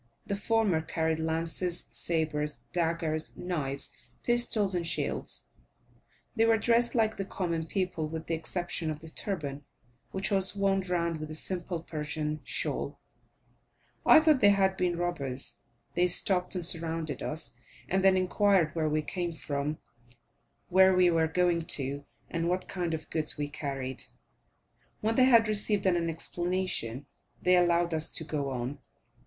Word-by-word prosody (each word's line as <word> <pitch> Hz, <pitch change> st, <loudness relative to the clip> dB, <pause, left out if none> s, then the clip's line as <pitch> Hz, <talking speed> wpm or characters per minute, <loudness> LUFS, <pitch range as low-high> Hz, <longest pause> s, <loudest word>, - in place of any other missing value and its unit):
The 200 Hz, -, -2 dB
former 205 Hz, -5 st, +1 dB
carried 160 Hz, 0 st, -2 dB
lances, 165 Hz, +2 st, -1 dB
sabres, 150 Hz, -3 st, -1 dB
daggers, 165 Hz, -2 st, -2 dB
knives, 145 Hz, -6 st, +1 dB, 0.3 s
pistols, 235 Hz, -5 st, +4 dB
and 175 Hz, -2 st, -1 dB
shields; -, -, -2 dB, 0.9 s
they 225 Hz, -, +3 dB
were 225 Hz, -1 st, +4 dB
dressed 235 Hz, +2 st, +2 dB
like 220 Hz, -2 st, +1 dB
the 195 Hz, -, -2 dB
common 170 Hz, -4 st, -3 dB
people, 180 Hz, -4 st, -2 dB
with 160 Hz, +1 st, -6 dB
the 165 Hz, -, -3 dB
exception 165 Hz, 0 st, -2 dB
of 155 Hz, -1 st, -5 dB
the 160 Hz, -, -7 dB
turban, 150 Hz, -6 st, -3 dB, 0.5 s
which 190 Hz, +1 st, -2 dB
was 195 Hz, 0 st, +5 dB
wound 195 Hz, -2 st, 0 dB
round 170 Hz, -2 st, -1 dB
with 155 Hz, 0 st, -6 dB
a 155 Hz, -, -1 dB
simple 175 Hz, 0 st, -1 dB
Persian 155 Hz, -1 st, -4 dB
shawl. -, -, -1 dB, 1.0 s
I 315 Hz, -, +8 dB
thought 310 Hz, -3 st, +3 dB
they 205 Hz, -, +7 dB
had 195 Hz, -1 st, +2 dB
been 180 Hz, -2 st, -1 dB
robbers. 140 Hz, -7 st, -2 dB, 0.3 s
They 175 Hz, +1 st, +2 dB
stopped 180 Hz, +1 st, +3 dB
and 180 Hz, -2 st, 0 dB
surrounded 165 Hz, -4 st, 0 dB
us, 155 Hz, +2 st, -2 dB, 0.4 s
and 190 Hz, +1 st, 0 dB
then 190 Hz, -1 st, +5 dB
inquired 185 Hz, -3 st, +2 dB
where 155 Hz, -2 st, -1 dB
we 155 Hz, 0 st, 0 dB
came 175 Hz, +1 st, -3 dB
from, 150 Hz, -1 st, -4 dB, 0.9 s
where 190 Hz, +1 st, +5 dB
we 180 Hz, -1 st, +4 dB
were 165 Hz, -1 st, +2 dB
going 175 Hz, 0 st, +1 dB, 0.2 s
to, 140 Hz, +1 st, -4 dB, 0.2 s
and 165 Hz, 0 st, -2 dB
what 180 Hz, +1 st, -2 dB
kind 175 Hz, -3 st, -2 dB
of 155 Hz, -, -10 dB
goods 155 Hz, -1 st, -1 dB
we 145 Hz, -1 st, -3 dB
carried? 135 Hz, -3 st, 0 dB, 1.0 s
When 220 Hz, +1 st, 0 dB
they 255 Hz, +2 st, +4 dB
had 230 Hz, -3 st, +5 dB
received 205 Hz, -1 st, +1 dB
an 175 Hz, -3 st, +1 dB
explanation, 175 Hz, -7 st, -2 dB, 0.3 s
they 180 Hz, +1 st, +3 dB
allowed 175 Hz, -1 st, +2 dB
us 160 Hz, 0 st, +4 dB
to -, -, 0 dB
go 145 Hz, -3 st, -3 dB
on. 130 Hz, +2 st, -4 dB
170 Hz, 150 wpm, -29 LUFS, 155-190 Hz, 1.0 s, I